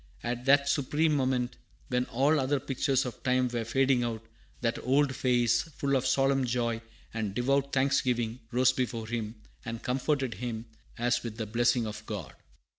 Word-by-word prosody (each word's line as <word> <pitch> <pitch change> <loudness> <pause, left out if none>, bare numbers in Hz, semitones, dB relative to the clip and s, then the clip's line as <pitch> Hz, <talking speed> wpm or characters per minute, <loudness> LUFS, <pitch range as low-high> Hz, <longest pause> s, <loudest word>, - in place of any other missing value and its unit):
At 120 +1 -3
that 140 +1 +5
supreme 150 +3 +2
moment, 130 -3 0 0.3
when 125 0 +1
all 140 +6 +2
other 135 +1 +1
pictures 135 0 0
of 125 -4 -6
time 125 0 +2
were 120 -1 -2
fading 130 +2 +2
out, 115 -1 -3 0.4
that 115 -1 0
old 135 +1 +2
face, 120 -2 +2
full 140 -4 -2
of 130 -1 +1
solemn 135 0 +3
joy 115 -2 -1 0.3
and 110 -3 -3
devout 140 +3 +1
thanksgiving, 125 -3 +1
rose 130 +1 +4
before 120 -3 -2
him, 110 -1 -4 0.3
and 115 -2 -6
comforted 135 0 0
him 115 +2 -5 0.3
as 120 +1 +1
with 115 -2 -6
the 110 - -2
blessing 120 +2 +2
of 105 0 -6
God. 95 - -5
125 Hz, 165 wpm, -29 LUFS, 115-135 Hz, 0.4 s, that